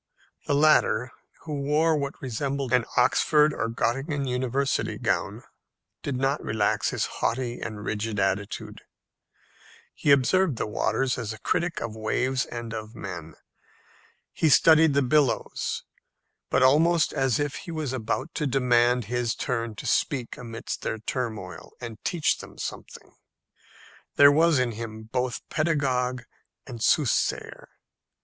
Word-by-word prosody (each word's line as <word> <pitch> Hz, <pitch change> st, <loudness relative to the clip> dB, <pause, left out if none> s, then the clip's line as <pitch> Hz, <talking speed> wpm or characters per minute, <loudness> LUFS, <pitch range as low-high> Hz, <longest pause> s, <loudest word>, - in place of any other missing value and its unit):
The 145 Hz, -, +2 dB
latter, 140 Hz, -5 st, +3 dB, 0.3 s
who 150 Hz, -3 st, -4 dB
wore 155 Hz, +3 st, +2 dB
what 140 Hz, -1 st, -3 dB
resembled 135 Hz, +1 st, -2 dB
an 125 Hz, -2 st, +3 dB
Oxford 150 Hz, +4 st, +4 dB
or 115 Hz, -, -2 dB
Gottingen 135 Hz, +5 st, -1 dB
university 130 Hz, +2 st, -1 dB
gown, -, -, -1 dB, 0.6 s
did 140 Hz, -, -3 dB
not 135 Hz, +3 st, 0 dB
relax 110 Hz, -1 st, 0 dB
his -, -, -1 dB
haughty 120 Hz, +1 st, -2 dB
and 105 Hz, -1 st, -6 dB
rigid 110 Hz, 0 st, -2 dB
attitude. 95 Hz, +1 st, -2 dB, 1.1 s
He -, -, -2 dB
observed 140 Hz, +4 st, +4 dB
the -, -, -1 dB
waters 125 Hz, +4 st, 0 dB
as 110 Hz, -3 st, -4 dB
a 110 Hz, -, -11 dB
critic 170 Hz, +8 st, -1 dB
of 115 Hz, -2 st, -4 dB
waves 130 Hz, +4 st, -1 dB
and 115 Hz, -1 st, -6 dB
of 110 Hz, 0 st, -7 dB
men. 80 Hz, -7 st, -7 dB, 1.0 s
He 160 Hz, -, +2 dB
studied 160 Hz, 0 st, +6 dB
the 140 Hz, -, +3 dB
billows, 140 Hz, 0 st, 0 dB, 0.7 s
but 130 Hz, -, +3 dB
almost 160 Hz, +5 st, +4 dB
as 135 Hz, -3 st, +1 dB
if 145 Hz, -1 st, -1 dB
he 175 Hz, -, -8 dB
was 155 Hz, -5 st, -3 dB
about 130 Hz, +5 st, -3 dB
to 150 Hz, -, -1 dB
demand 125 Hz, -2 st, +2 dB
his 120 Hz, 0 st, -1 dB
turn 115 Hz, -3 st, -3 dB
to -, -, -8 dB
speak 130 Hz, -5 st, 0 dB
amidst 115 Hz, -1 st, -6 dB
their 110 Hz, -, -2 dB
turmoil, 110 Hz, -7 st, -5 dB
and 115 Hz, -3 st, -8 dB
teach 170 Hz, -4 st, +1 dB
them -, -, -11 dB
something. -, -, -8 dB, 1.0 s
There 140 Hz, 0 st, +8 dB
was 160 Hz, +1 st, +4 dB
in 125 Hz, -2 st, +1 dB
him 110 Hz, 0 st, -7 dB
both 125 Hz, +2 st, -3 dB
pedagogue 130 Hz, -6 st, 0 dB, 0.4 s
and 120 Hz, -4 st, -8 dB
soothsayer. 140 Hz, +1 st, +1 dB
125 Hz, 135 wpm, -26 LUFS, 115-145 Hz, 1.1 s, There